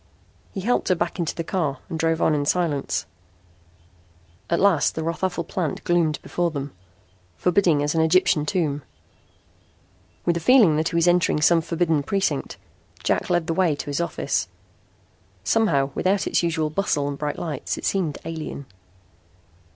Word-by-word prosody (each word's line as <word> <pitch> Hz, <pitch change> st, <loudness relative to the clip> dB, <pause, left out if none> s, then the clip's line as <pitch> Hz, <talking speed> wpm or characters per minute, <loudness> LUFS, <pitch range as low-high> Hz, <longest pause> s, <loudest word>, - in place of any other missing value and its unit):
He 195 Hz, -, -5 dB
helped 240 Hz, +6 st, 0 dB
her 185 Hz, -, +3 dB
back 170 Hz, +2 st, -3 dB
into 170 Hz, -, -1 dB
the 165 Hz, -, -3 dB
car 160 Hz, -6 st, -1 dB
and 165 Hz, -, -5 dB
drove 165 Hz, 0 st, +1 dB
on 160 Hz, -, +3 dB
in 145 Hz, -1 st, +1 dB
silence. 160 Hz, -6 st, 0 dB, 1.4 s
At 170 Hz, -, +1 dB
last 190 Hz, -7 st, +3 dB
the 160 Hz, -, -3 dB
Rothafel 170 Hz, +2 st, -2 dB
plant 165 Hz, -3 st, -3 dB
gloomed 165 Hz, -4 st, +1 dB
before 175 Hz, -1 st, -1 dB
them, 140 Hz, -3 st, -5 dB, 0.6 s
forbidding 175 Hz, -, +2 dB
as 150 Hz, -, 0 dB
an 165 Hz, -, +2 dB
Egyptian 160 Hz, -2 st, +3 dB
tomb. 155 Hz, -7 st, 0 dB, 1.4 s
With 170 Hz, -, +2 dB
a -, -, 0 dB
feeling 210 Hz, -, +5 dB
that 160 Hz, +2 st, +1 dB
he -, -, -6 dB
was 170 Hz, +1 st, +3 dB
entering 175 Hz, -3 st, +3 dB
some 165 Hz, +2 st, +4 dB
forbidden 165 Hz, -2 st, 0 dB
precinct, 195 Hz, +7 st, -1 dB, 0.5 s
Jack -, -, 0 dB
led 175 Hz, -2 st, +1 dB
the 165 Hz, -, -1 dB
way 170 Hz, -3 st, +2 dB
to -, -, -6 dB
his 145 Hz, -, -1 dB
office. 170 Hz, -, -1 dB, 1.0 s
Somehow, 140 Hz, -12 st, +2 dB
without 190 Hz, +5 st, +1 dB
its -, -, +1 dB
usual 165 Hz, -3 st, -1 dB
bustle 150 Hz, -5 st, 0 dB
and 145 Hz, -, -3 dB
bright 145 Hz, +1 st, -3 dB
lights, 155 Hz, -6 st, -4 dB
it -, -, -6 dB
seemed 175 Hz, -7 st, 0 dB
alien. 160 Hz, -3 st, -6 dB
165 Hz, 160 wpm, -23 LUFS, 150-180 Hz, 1.4 s, feeling